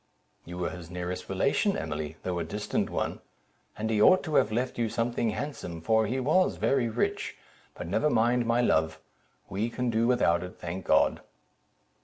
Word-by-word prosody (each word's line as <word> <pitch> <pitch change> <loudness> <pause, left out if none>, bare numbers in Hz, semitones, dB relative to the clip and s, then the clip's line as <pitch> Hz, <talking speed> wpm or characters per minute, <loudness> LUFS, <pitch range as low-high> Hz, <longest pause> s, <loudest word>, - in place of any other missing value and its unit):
"You 85 +1 -8
were 90 - -2
his 85 -2 -9
nearest 90 0 -5
relation, 140 - +1
Emily, 80 0 -4
though 90 -1 -2
a - - -1
distant 105 +6 -2
one; - - -3 0.6
and 110 +1 -2
he 105 -1 +2
ought 185 +10 +6
to 155 - -5
have 110 - +3
left 125 +2 -2
you 115 -1 +1
something 115 0 0
handsome, 105 - -5
for 110 +6 +2
he 130 +5 -1
was 155 +8 +2
very 130 -4 +1
rich: 115 +2 -2 0.4
but - - -6
never 100 - +1
mind, 120 -1 +2
my 120 +1 +3
love—we 80 +4 -2
can 125 +1 -2
do 115 +1 +2
without 105 -9 +3
it, 90 0 -8
thank 85 +2 -6
God." - - +3
110 Hz, 175 wpm, -28 LUFS, 90-120 Hz, 0.6 s, ought